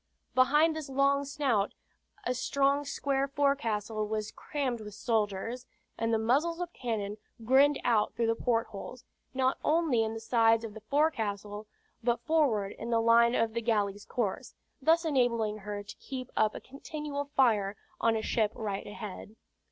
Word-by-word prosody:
Behind 295 +5 +4
this 310 -3 -5
long 275 +1 +2
snout, 270 -8 0 0.5
a 250 - +1
strong 280 +3 +1
square 275 -1 0
forecastle 225 -7 0
was 215 0 -3
crammed 260 -6 -3
with 210 -1 -9
soldiers, 225 +2 -1 0.3
and 225 0 -1
the 225 - +3
muzzles 285 +10 +1
of 350 -1 -4
cannon 215 -4 -3 0.3
grinned 275 +4 +5
out 220 -3 +2
through 230 -1 +2
port 230 0 0
holes, 245 +5 -9 0.3
not 260 0 +1
only 310 -7 +2
in 220 0 -3
the - - -4
sides 225 0 +3
of 220 -2 -6
the 220 - -10
forecastle, 215 -6 -1 0.4
but 240 0 +1
forward 265 -11 +2
in 230 - -5
the 230 -1 +3
line 235 +1 +5
of 225 -1 +1
the 235 - -1
galley's 205 -3 0
course, 220 -6 -3 0.3
thus 330 +4 +3
enabling 235 -7 +1
her 205 0 -5
to 205 - -10
keep 255 -2 -7
up 215 -1 +2
a - - -5
continual 285 +1 -5
fire 210 -6 +3 0.2
on 230 -1 +3
a 220 - -2
ship 215 -2 +1
right 205 -3 -4
ahead. 205 0 -8
235 Hz, 160 wpm, -30 LUFS, 215-275 Hz, 0.5 s, grinned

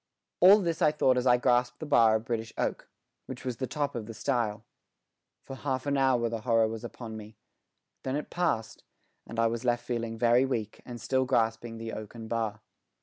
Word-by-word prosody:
All 190 +4 +9
this 170 -3 -2
I 150 - +5
thought 135 -4 +3
as 125 +1 0
I 125 0 +6
grasped 125 0 +2
the 155 - -6
bar 115 -6 +5
of 110 +1 -2
British 115 -3 -3
oak, - - -2 0.4
which 130 -1 -8
was 125 -3 -3
the 130 - -3
top 145 0 -2
of 110 -3 -5
the 115 - -8
stile. 115 -6 -1 0.8
For 135 - -8
half 130 -1 -3
an 140 0 +1
hour 130 -3 +3
the 115 -1 -4
horror 115 -1 +3
was 110 +1 -6
upon 115 -1 -7
me. 110 0 -10 0.6
Then 130 +1 -2
it 150 - -4
passed, 165 -11 -1 0.4
and 115 - -8
I 115 - +4
was 115 +1 -1
left 120 -1 0
feeling 115 -2 -3
very 120 +2 +4
weak 115 -6 -3
and 120 -1 -7
still 130 +1 +1
grasping 115 -2 0
the 115 0 -6
oaken 110 +1 -7
bar. 110 -2 -2
120 Hz, 205 wpm, -29 LUFS, 115-130 Hz, 0.8 s, All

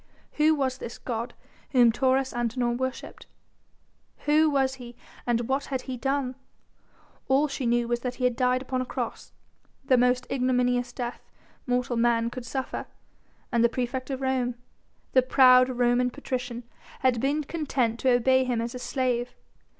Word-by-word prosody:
Who 310 +1 +4
was 265 -2 -1
this 235 - -7
god 235 0 -4 0.4
whom 240 -3 +6
Taurus 260 +2 +1
Antinor 240 0 -1
worshipped? 260 +1 -5 1.0
Who 305 +1 +4
was 270 -2 +1
he 240 0 -10 0.3
and 240 -1 +2
what 270 +1 0
had 265 -2 -3
he 260 - -5
done? 270 +1 -1 0.9
All 275 +3 +3
she 270 -3 -3
knew 240 0 +2
was 240 0 0
that 250 0 -4
he 255 - -6
had 250 -1 +2
died 255 +1 +1
upon 255 -1 -2
a - - -3
cross, - - -5 0.5
the 260 -2 +4
most 250 +1 +2
ignominious 250 -1 +1
death 245 -1 -5 0.5
mortal 245 -1 0
man 230 0 +2
could 250 -1 -7
suffer, 265 -1 -4 0.6
and 235 -1 +2
the 235 - +5
praefect 255 +2 -3
of 270 -1 -3
Rome, 255 -2 0 0.6
the 255 - +6
proud 255 0 +6
Roman 245 0 +2
patrician, 250 -2 -5 0.4
had 255 -3 +2
been 290 +3 +1
content 270 -7 -1
to 260 - +2
obey 260 +2 +4
him 245 -2 -1
as 235 +1 -3
a 250 - -6
slave. 250 -2 -1
250 Hz, 160 wpm, -26 LUFS, 240-265 Hz, 1.0 s, whom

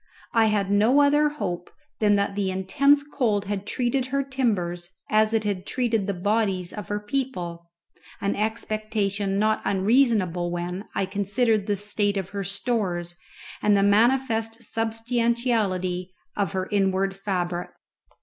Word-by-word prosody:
I 225 -1 +5
had 205 -2 +1
no 220 +7 +4
other 295 +1 +4
hope 180 -11 -4 0.3
than 210 -1 +4
that 200 0 0
the 200 -1 -1
intense 275 +10 +3
cold 230 -8 0
had 200 0 -4
treated 250 +1 0
her 275 +1 0
timbers 195 -11 -1 0.2
as 215 0 +4
it 225 -1 +1
had 200 -3 -2
treated 230 -5 0
the 200 - 0
bodies 195 -2 0
of 210 - -7
her 205 0 -2
people, 205 -8 -4 0.5
an 200 0 -1
expectation 215 -2 -1
not 215 +1 +2
unreasonable 195 -4 +2
when 175 +3 -4
I 195 - +1
considered 205 +2 0
the 205 - +1
state 205 0 0
of 190 -1 -3
her 200 0 -4
stores 190 -4 -1 0.5
and 205 -1 +4
the 195 - +3
manifest 225 +1 +2
substantiality 225 -6 -1 0.2
of 200 -5 -1
her 185 0 -2
inward 195 -1 +1
fabric. 180 -3 -2
205 Hz, 140 wpm, -25 LUFS, 190-230 Hz, 0.5 s, I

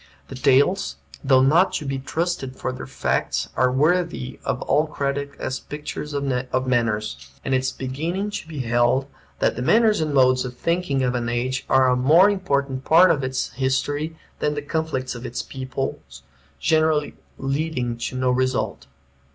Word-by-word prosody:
The - - -7
tales, 140 - +3 0.3
though 130 -1 +5
not 165 +8 +4
to 150 - -3
be 135 -1 -2
trusted 145 -2 -2
for 130 - -3
their 130 - -7
facts, 70 +1 -1
are 130 0 +3
worthy 155 -2 0
of - - -2
all 150 +3 +2
credit 140 -1 -2
as 130 - -3
pictures 150 0 -6
of 130 -2 -1
manners; 105 - -1 0.2
and 135 - 0
it 130 - +4
is 130 0 -1
beginning 165 +10 -3
to 185 - -5
be 155 -4 -5
held 120 +2 +2 0.3
that - - +1
the - - -4
manners 215 - +4
and 155 -1 -1
modes 130 -2 +4
of 125 -1 -7
thinking 170 -6 0
of 125 -1 +1
an 120 -1 -2
age 130 +2 -2
are 130 -1 +5
a 125 - +3
more 160 +11 +5
important 140 -9 -1
part 175 +5 +6
of 145 -4 0
its 130 0 -2
history 140 +5 -1 0.2
than 150 0 0
the 145 - -4
conflicts 145 -4 -2
of 120 -1 -8
its 120 -1 -4
peoples, 130 - -6 0.4
generally 155 -2 +2 0.2
leading 135 -3 -2
to 125 - -4
no 130 0 +2
result. 130 - -1
135 Hz, 170 wpm, -23 LUFS, 130-155 Hz, 0.4 s, part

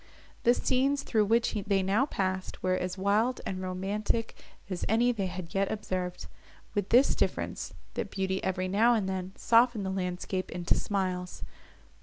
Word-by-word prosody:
The 240 +1 +4
scenes, 275 +3 +1
through 215 -3 +2
which 230 +3 +2
they 200 -2 +1
now 210 +9 +2
passed, 190 -6 -3
were 185 0 +2
as 185 0 -2
wild 210 +6 +2
and 185 -1 -3
romantic, 200 +5 -2 0.3
as 185 -3 -4
any 235 +3 +4
they 200 -5 -2
had 180 -2 -7
yet 195 0 +1
observed, 185 -4 -3 0.5
with 205 -2 -1
this 255 +4 +5
difference, - - -2 0.2
that - - -3
beauty, 190 -1 -2
every 185 0 -1
now 225 +6 +4
and 205 -4 0
then, 190 -1 -3
softened 230 -3 +3
the 190 - -1
landscape 185 0 -3
into 175 0 0
smiles. 185 -3 -2
195 Hz, 160 wpm, -29 LUFS, 185-225 Hz, 0.5 s, this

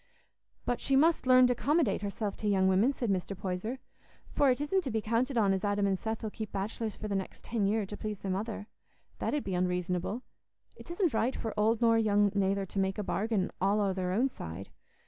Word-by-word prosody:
"But 245 - -1
she 275 - +1
must 310 0 +3
learn 255 0 +7
to 250 - +3
'commodate 265 - +1
herself 205 0 -3
to 215 - -3
young 190 -2 +3
women," 195 +8 +4
said 240 -6 -2
Mr. 190 +1 -2
Poyser, 190 +7 -3 0.5
"for 285 - +3
it 250 - +2
isn't 365 +6 0
to - - -1
be 220 -2 0
counted 235 +4 0
on 200 -4 +4
as 190 +1 -2
Adam 205 0 +1
and 195 -1 +1
Seth 220 +1 -4
'ull 215 - -3
keep 215 -1 -6
bachelors 215 +2 -3
for 215 - -5
the 205 - -2
next 195 -1 -4
ten 215 -4 0
year 215 +1 +1
to 210 - -7
please 210 0 -4
their 195 - -2
mother. 205 +2 -3 0.5
That - - -1
'ud 295 - -1
be 190 - -3
unreasonable. 180 +5 -1 0.5
It - - -13
isn't 345 - 0
right 235 +3 +1
for 225 - -4
old 220 +2 +2
nor 230 -1 +5
young 205 -2 +3
nayther 195 0 +1
to 195 - -4
make 190 0 0
a 210 - -2
bargain 200 -1 -1
all 200 +2 +3
o' 200 -2 +1
their 185 -1 -2
own 235 +8 +2
side. 90 - -8
210 Hz, 225 wpm, -31 LUFS, 195-235 Hz, 0.5 s, learn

